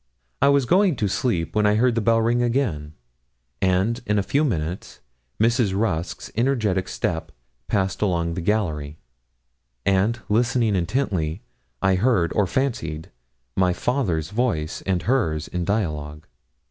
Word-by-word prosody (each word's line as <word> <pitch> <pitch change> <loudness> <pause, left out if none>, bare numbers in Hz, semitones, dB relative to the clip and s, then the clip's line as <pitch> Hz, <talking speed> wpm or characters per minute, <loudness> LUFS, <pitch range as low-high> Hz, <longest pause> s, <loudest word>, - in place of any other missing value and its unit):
I 140 - +5
was 140 -2 +3
going 185 +3 +3
to 105 - 0
sleep 95 -4 -1
when 105 -1 +3
I 105 - +3
heard 120 +2 +3
the 115 - 0
bell 115 +1 +3
ring 120 +2 +2
again; 115 - -1 0.7
and, 95 +6 +1
in 105 0 +2
a 100 - +2
few 145 +8 +1
minutes, 90 - -3 0.4
Mrs. 110 -3 +2
Rusk's 85 -6 -2
energetic 110 -6 +1
step 80 -2 -3 0.4
passed 95 -2 -1
along 85 -4 0
the 90 - -3
gallery; 80 -7 -1 0.9
and, 100 +5 +2
listening 115 0 +2
intently, 90 - -1 0.4
I 95 0 +4
heard, 95 -6 +2
or 105 -3 +2
fancied, 80 - -2 0.4
my 90 -1 +3
father's 95 - -1
voice 105 -9 -1
and 90 -3 0
hers 85 - 0
in 90 -1 -3
dialogue. 75 -7 -2
100 Hz, 140 wpm, -23 LUFS, 85-120 Hz, 0.9 s, I